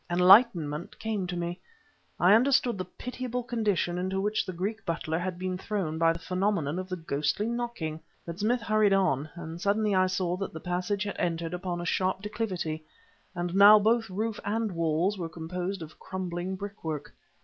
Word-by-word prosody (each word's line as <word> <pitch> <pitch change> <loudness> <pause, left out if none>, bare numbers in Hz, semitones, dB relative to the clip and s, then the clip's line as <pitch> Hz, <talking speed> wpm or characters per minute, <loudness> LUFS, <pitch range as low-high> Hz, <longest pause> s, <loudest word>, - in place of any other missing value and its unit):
Enlightenment 175 -4 +4
came 215 -4 -2
to 180 0 -4
me, 175 +1 -3 0.6
and 180 - +4
I - - +8
understood 250 0 +3
the 185 - -2
pitiable 250 +5 -5
condition 205 -7 0
into 190 +1 -1
which 210 +2 0
the - - -2
Greek 200 +5 -3
butler 165 -1 -2
had 180 0 -3
been 185 0 -3
thrown 185 -7 -2
by 165 0 +5
the 165 - -3
phenomenon 180 -3 -1
of 185 0 -6
the 185 - -2
ghostly 155 +3 -1
knocking. 235 -10 -3 0.3
But 170 +2 -7
Smith 235 +3 +1
hurried 215 -2 +3
on, 155 -7 +2
and 170 0 -7
suddenly 205 +1 +2
I 185 0 +4
saw 185 -1 -1
that 195 0 -4
the 160 - -6
passage 180 +4 -1
had 200 -1 -4
entered 165 -1 -1
upon 180 -1 -3
a - - -5
sharp 185 +2 0
declivity; 185 -7 -3 0.5
and 175 0 -2
now 200 +2 +9
both 225 +1 +2
roof 215 +3 -2
and 220 +1 -1
walls 170 +4 0
were 165 -2 -3
composed 175 +3 -4
of 155 - -12
crumbling 185 0 -4
brickwork. 185 -7 -6
185 Hz, 180 wpm, -28 LUFS, 170-210 Hz, 0.6 s, now